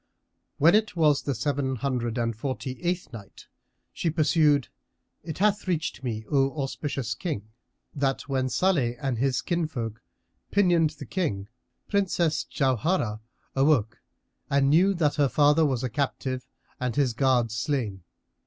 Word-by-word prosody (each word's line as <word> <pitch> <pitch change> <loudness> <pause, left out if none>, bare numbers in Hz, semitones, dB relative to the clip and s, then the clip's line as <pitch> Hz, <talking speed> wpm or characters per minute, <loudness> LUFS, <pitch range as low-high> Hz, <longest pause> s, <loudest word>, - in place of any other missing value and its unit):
When 160 +4 +5
it 215 -2 +2
was 150 -4 +3
the 140 - -2
Seven 130 +2 -1
Hundred 125 -2 -2
and 115 -1 -1
Forty 130 +2 -4
eighth 175 -5 -2
Night, 105 -4 -11 0.5
She 170 - -1
pursued, 155 -3 +3 0.5
It 160 -1 -6
hath 205 0 +1
reached 160 -6 -2
me, 110 -3 -3
O 135 +1 +2
auspicious 135 -4 -3
King, 110 - -4 0.4
that 135 -2 -1
when 130 -2 0
Salih 140 -9 +1
and 130 -4 -2
his 135 0 +1
kinsfolk 140 - -2 0.5
pinioned 175 -5 +3
the - - -8
King, 105 - -2 0.4
Princess 180 -5 +1
Jauharah 130 - 0 0.4
awoke 135 -6 +2 0.5
and 140 0 +3
knew 190 +5 +4
that 155 -4 +1
her 145 -2 +3
father 150 +2 +4
was 130 -3 -1
a - - +1
captive 130 0 -2 0.3
and 125 -2 -2
his 135 -5 +2
guards 120 -2 +2
slain. 120 -6 -2
140 Hz, 140 wpm, -26 LUFS, 125-160 Hz, 0.5 s, When